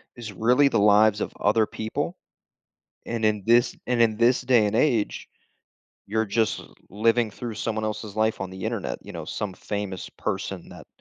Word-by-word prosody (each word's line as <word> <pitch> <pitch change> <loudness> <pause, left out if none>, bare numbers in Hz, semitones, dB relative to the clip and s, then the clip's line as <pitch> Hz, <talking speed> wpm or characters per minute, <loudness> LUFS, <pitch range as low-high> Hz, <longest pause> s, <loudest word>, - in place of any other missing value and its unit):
is 115 -4 -8
really 125 +7 +4
the 115 - +1
lives 105 +1 +5
of - - -2
other 110 +1 +3
people. 110 0 -4 0.9
And 115 -1 -3
in 105 -1 +2
this 120 +2 +3
and 125 -1 +1
in 110 -2 +4
this 120 +3 +3
day 120 -4 +4
and 105 +1 -1
age, 120 -6 +1 0.8
you're 110 +2 0
just 110 +1 0 0.3
living 115 +3 +2
through 115 +2 -6
someone 110 0 -2
else's 110 -1 -5
life 110 -1 +1
on 95 - -4
the 95 0 -9
Internet, - - -3
you - - -9
know, - - -5
some 105 -3 -4
famous 100 -1 -5
person - - -4
that - - -12
110 Hz, 175 wpm, -25 LUFS, 105-115 Hz, 0.9 s, lives